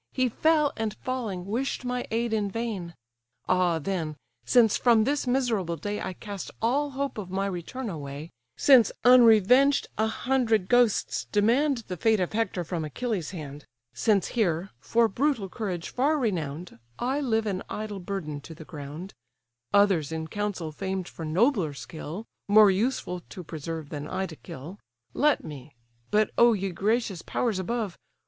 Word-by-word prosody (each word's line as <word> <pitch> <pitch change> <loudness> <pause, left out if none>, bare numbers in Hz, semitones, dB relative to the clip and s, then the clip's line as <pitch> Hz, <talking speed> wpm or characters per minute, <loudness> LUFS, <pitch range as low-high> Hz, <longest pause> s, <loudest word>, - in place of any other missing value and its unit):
He 255 -1 +2
fell, 305 +3 +2
and 220 -2 -2
falling, 225 -9 -3
wish'd 250 +5 -2
my 250 0 -2
aid 230 0 -1
in 210 -2 0
vain. 195 -6 -4 0.5
Ah 180 -2 +2
then, 160 -2 -3 0.3
since 235 -4 +4
from 230 -3 +4
this 280 +2 0
miserable 230 -9 0
day 205 +7 -4
I 185 - -3
cast 200 0 -7
all 275 +6 +1
hope 275 -3 -3
of 190 -3 -6
my 195 +1 -1
return 200 +7 -4
away; 150 -3 -6 0.3
Since, 255 -6 +6
unrevenged, 250 +3 +6
a 220 - +3
hundred 225 -4 +1
ghosts 245 -3 +2
demand 235 +5 +2
The 180 - -5
fate 220 +3 +3
of 180 +1 -1
Hector 215 -5 -1
from 165 -1 -3
Achilles' 185 - -3
hand; 150 -5 -8 0.3
Since 205 -5 +2
here, 190 -5 0
for 230 - +2
brutal 235 -1 0
courage 185 -4 -4
far 290 +5 +1
renown'd, 175 - -3 0.2
I 265 +4 -1
live 225 -5 +1
an 195 -3 -2
idle 210 -2 -5
burden 175 -6 -5
to 160 +3 -10
the 160 - -11
ground, 155 +3 -8 0.6
(Others 190 -7 +3
in 160 0 -4
council 205 -5 -3
famed 190 +3 -3
for 165 - -7
nobler 180 - +2
skill, 160 +7 -7 0.2
More 205 0 +7
useful 190 -3 -1
to 180 - -8
preserve, 160 -1 -6
than 145 0 -5
I 190 +3 -2
to 165 - -9
kill,) 155 +8 -10 0.3
Let 300 +1 +2
me—But 125 - -3
oh! 235 0 +7
ye 195 -2 -2
gracious 205 0 0
powers 225 -6 -1
above! 215 -1 -3
200 Hz, 155 wpm, -27 LUFS, 170-235 Hz, 0.6 s, More